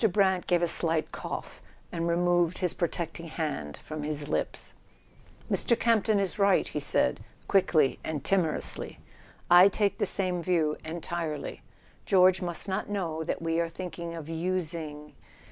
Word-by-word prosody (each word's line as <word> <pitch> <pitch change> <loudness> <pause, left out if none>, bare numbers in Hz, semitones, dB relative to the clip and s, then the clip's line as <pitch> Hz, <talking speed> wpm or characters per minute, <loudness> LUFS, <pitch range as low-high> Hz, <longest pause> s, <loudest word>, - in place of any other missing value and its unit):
Brant 190 -1 +2
gave 175 -1 +2
a - - +3
slight 165 -1 +2
cough - - -6 0.3
and 170 0 -2
removed 175 0 +2
his 180 -3 0
pro¬ 170 - -1
tecting 165 0 -6
hand 150 - -4
from 155 -1 -5
his 150 -1 -3
lips. - - -3 0.7
"Mr. 235 - +1
Campton 220 -2 +2
is 195 +1 -2
right," 200 -1 +3
he - - -4
said, - - +1 0.2
quickly 170 -8 +3
and 150 -4 -4
timor¬ 180 -6 +1
ously. - - 0 0.5
"I 175 +2 +9
take 200 +1 0
the - - +1
same 180 -3 +2
view—entirely. 165 -1 -2 0.5
George 185 -1 +5
must 175 +1 -2
not 190 +2 -2
know 170 -6 -2
that 165 - -3
we 165 0 0
are 170 -1 0
thinking 170 -1 -6
of 160 -3 -7
using 160 -3 -3
170 Hz, 150 wpm, -28 LUFS, 160-185 Hz, 0.7 s, I